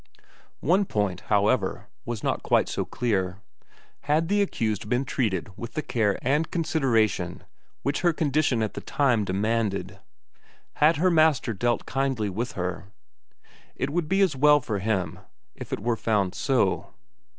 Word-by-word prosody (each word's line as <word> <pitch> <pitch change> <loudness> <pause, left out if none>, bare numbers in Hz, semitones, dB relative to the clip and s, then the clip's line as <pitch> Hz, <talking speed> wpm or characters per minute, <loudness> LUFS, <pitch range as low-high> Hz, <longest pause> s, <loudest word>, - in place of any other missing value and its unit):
One 185 +7 +3
point, 100 - -1
however, 105 0 +1 0.2
was 120 -2 -4
not - - 0
quite - - +2
so - - -2
clear: 95 -6 -1 0.7
had 155 +3 +1
the 205 0 +3
accused 110 - -1
been 125 +3 +1
treated 105 -6 -2
with 115 +2 -7
the 155 - -1
care 105 -5 +1
and 150 +5 +1
consideration 135 - 0 0.4
which 140 +1 -1
her 175 -1 +4
condition 145 -6 +1
at 110 - -3
the - - -6
time 125 -7 +1
demanded? 105 +1 -1 0.8
Had 155 +2 +4
her 180 +4 +3
master 155 -7 +3
dealt 120 +4 0
kindly 135 -7 -1
with 120 +6 -3
her? 90 +1 -4 0.9
It 135 - -2
would 165 -1 -1
be 195 +1 +2
as 185 -7 +3
well 150 +2 +5
for 110 -6 -3
him 95 -3 -1 0.3
if - - -10
it - - -2
were 115 +2 0
found 100 -5 0
so. 100 - 0
120 Hz, 150 wpm, -26 LUFS, 105-150 Hz, 0.9 s, well